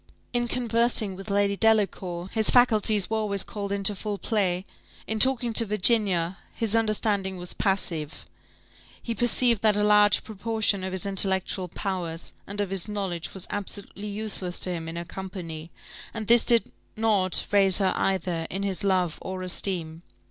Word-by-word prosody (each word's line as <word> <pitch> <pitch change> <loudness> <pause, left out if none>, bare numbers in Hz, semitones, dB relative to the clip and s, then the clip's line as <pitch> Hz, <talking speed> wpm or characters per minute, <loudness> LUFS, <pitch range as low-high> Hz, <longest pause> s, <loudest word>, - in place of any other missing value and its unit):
In 240 0 0
conversing 235 -4 +1
with 195 +3 -9
Lady 200 0 +1
Delacour, 195 -5 0
his 220 -1 +1
faculties 215 -5 +3
were 220 - -1
always 200 -2 -1
called 200 -1 -6
into 200 0 +2
full 205 +1 -4
play; 190 -4 -1 0.4
in 220 0 -3
talking 245 -1 +5
to 230 - +7
Virginia, 195 -4 +3 0.2
his 225 -2 +1
understanding 210 -3 0
was 180 0 -5
passive: 170 -6 -2 0.7
he 235 - -4
perceived 240 -1 +3
that 215 -2 +3
a 210 - +2
large 210 -1 +4
proportion 220 -2 -1
of 190 - -3
his 190 0 -3
intellectual 190 -1 0
powers, 175 -3 -4
and 200 +1 -7
of 200 -2 -2
his 195 0 -1
knowledge, 195 -6 -4
was 190 - -4
absolutely 205 0 -6
useless 200 -4 -4
to 185 - -2
him 165 -2 -5
in 165 - -7
her 170 0 -5
company; 170 -3 -7 0.5
and 220 -1 -4
this 235 +2 +5
did 235 -2 +2 0.3
not 205 -5 +2
raise 195 -2 +4
her 195 -2 +1
either 175 -3 -1
in 195 +2 -4
his 195 0 -3
love 185 -4 0
or 185 0 -5
esteem. 175 -3 -3
200 Hz, 160 wpm, -26 LUFS, 185-215 Hz, 0.7 s, to